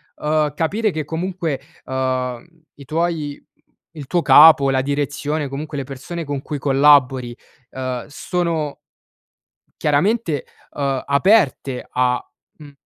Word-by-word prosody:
uhm, 150 -1 0
capire 210 +6 0
che 155 -2 -4
comunque, 165 -3 -3 0.2
uhm, 130 -2 -2 0.3
i 140 - -13
tuoi 155 -1 -2
mhmm, - - -35 0.5
il 145 - -7
tuo 175 +6 0
capo, 150 -4 +7
la 130 -1 +1
direzione, 145 +1 -2
comunque, 145 +3 -6
le 140 - -2
persone 140 +6 -7
con 145 -2 -4
cui 150 - -5
collabori, 135 -3 +3 0.4
uhm, 130 -2 -4
sono 160 -1 -2 1.1
chiaramente, 160 - +1 0.3
uhm, 135 -2 -2
aperte 140 - +2
a, 125 0 +1 0.4
mhmm, 150 -2 -13
145 Hz, 120 wpm, -20 LUFS, 135-160 Hz, 1.1 s, capo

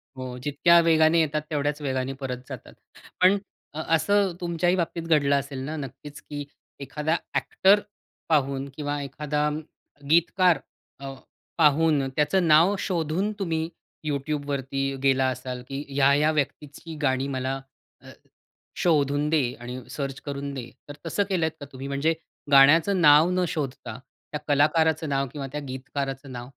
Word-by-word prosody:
हो, 130 -1 -6
जितक्या 170 +4 +4
वेगाने 160 0 +4
येतात 150 -1 +1
तेवढ्याच 145 0 -1
वेगाने 130 -1 -2
परत 125 -2 -3
जातात. - - -9 0.5
पण 190 +2 +6 0.4
अ, 155 - -4
असं 195 +3 +2
तुमच्याही 175 +1 +1
बाबतीत 170 -1 -2
घडलं 140 -3 +3
असेल 140 -1 -7
ना, 155 +2 -4
नक्कीच 140 +1 -8
की 145 -1 -7 0.3
एखादा 150 +3 -2 0.2
अ‍ॅक्टर 200 +2 +3 0.5
पाहून 140 -2 +1
किंवा 145 -1 -3
एखादा 150 +2 -2
अ, - - 0 0.6
गीतकार 170 +2 +4 0.4
अ, 135 0 -6 0.4
पाहून 150 -2 +3
त्याचं 160 +4 +2
नाव 165 +6 +5
शोधून, 180 +3 -1
तुम्ही 165 -3 -1 0.4
YouTubeवरती 140 -2 -2 0.2
गेला 135 -1 +3
असाल, 125 0 -6
की 140 +1 -5
ह्या-ह्या 140 +2 +3
व्यक्तीची 150 +3 -4
गाणी 130 -1 +1
मला 130 +1 -2 0.4
अ, - - -14 0.7
शोधून 145 -3 +2
दे 155 -4 +3 0.2
आणि 125 +1 -7
सर्च 135 0 -4
करून 140 0 -4
दे. 125 -3 -6 0.2
तर - - -6
तसं 200 +5 0
केलत 165 -4 +1
का 145 - -7
तुम्ही 135 +1 -7
म्हणजे 140 +4 +1 0.4
गाण्याचं 160 +7 +6
नाव 150 +2 +7
न 180 0 +1
शोधता, 135 -8 -4 0.4
त्या 150 - -2
कलाकाराचं 155 +2 +2
नाव 135 0 0
किंवा 140 -2 -5
त्या 150 - -4
गीतकाराचं 135 +1 -5
नाव? 120 0 -7
145 Hz, 140 wpm, -25 LUFS, 135-160 Hz, 0.7 s, नाव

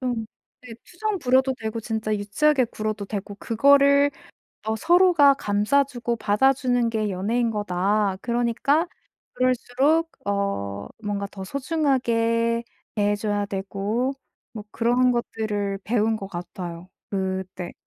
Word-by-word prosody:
좀 245 -4 -2 0.4
네. 240 -2 -10
투정 415 +2 -3
부려도 260 -1 +2
되고 220 +1 -4
진짜 220 -1 -2
유치하게 255 +8 +2
굴어도 215 -1 -4
되고 200 0 -5
그거를 280 +5 +4 0.5
더 220 0 -1
서로가 335 - +5
감싸 210 +5 +2
주고 240 -3 -3
받아 220 +5 +3
주는 245 -3 0
게 215 -2 -1
연애인 225 +6 0
거다. 205 -1 0
그러니까 240 +7 +1 0.5
그럴수록 260 +6 +1 0.2
어 200 - -2
뭔가 205 -1 -2
더 190 -1 -8
소중하게 235 - 0 0.3
대해 205 -1 +2
줘야 205 -1 -1
되고 200 +6 -2 0.4
뭐 215 -3 -8
그런 245 +2 +3
것들을 210 -4 -2
배운 225 0 +1
거 195 - -6
같아요. 175 -1 -7 0.2
그때. 190 -2 -3
225 Hz, 260 characters per minute, -24 LUFS, 205-255 Hz, 0.5 s, 서로가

